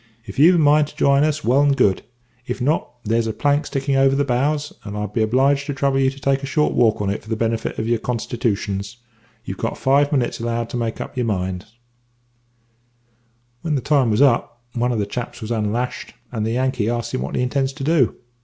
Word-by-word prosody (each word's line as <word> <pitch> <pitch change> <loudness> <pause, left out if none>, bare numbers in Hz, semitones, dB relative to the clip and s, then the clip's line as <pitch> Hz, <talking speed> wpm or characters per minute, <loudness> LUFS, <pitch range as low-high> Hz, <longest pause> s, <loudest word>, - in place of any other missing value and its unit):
If 130 - -7
you've 170 +5 +7
a - - +3
mind 150 -1 +4
to - - -14
jine 140 +1 +3
us, 155 0 0
well 130 +5 +3
and 140 -1 +3
good; 95 -2 +3 0.5
if 125 - -3
not, 145 +5 0 0.2
there's 115 +1 +1
a 110 - -2
plank 145 +6 +1
sticking 135 0 -1
over 135 0 +4
the 140 +1 +1
bows, 145 +4 0
and 105 -1 -6
I'll 105 - -2
be 105 +3 -2
obliged 135 +5 +2
to 145 - -3
trouble 135 0 +1
you 135 0 +3
to 135 +1 -10
take 135 0 +1
a 140 - -5
short 150 +2 +1
walk 110 -3 +2
on 100 - 0
it 100 - -4
for 110 - -15
the 110 - 0
benefit 115 0 -2
of 110 - -2
your 120 -1 +1
constitooshuns. 110 -3 -2 0.5
You've 95 - -6
got 115 - -2
five 140 +2 +3
minutes 130 -5 0
allowed 115 0 -2
to - - -3
make 115 -2 -3
up - - -7
your 125 -2 0
minds.' 95 +2 -3 1.8
"When 155 -3 -1
the 135 - -1
time 135 -3 +2
was 110 +6 +3
up, 120 -2 +1
one 120 +1 0
of 120 - -1
the 105 - 0
chaps 120 +4 -6
was 110 0 -6
unlashed, 115 +2 -2 0.2
and 110 -3 -2
the 115 - -1
Yankee 130 -3 0
asks 120 +1 -3
him 130 - -1
what - - -4
he - - +1
intends 135 +1 0
to 140 0 -7
do. 150 -4 +2
125 Hz, 230 wpm, -21 LUFS, 115-140 Hz, 1.8 s, you've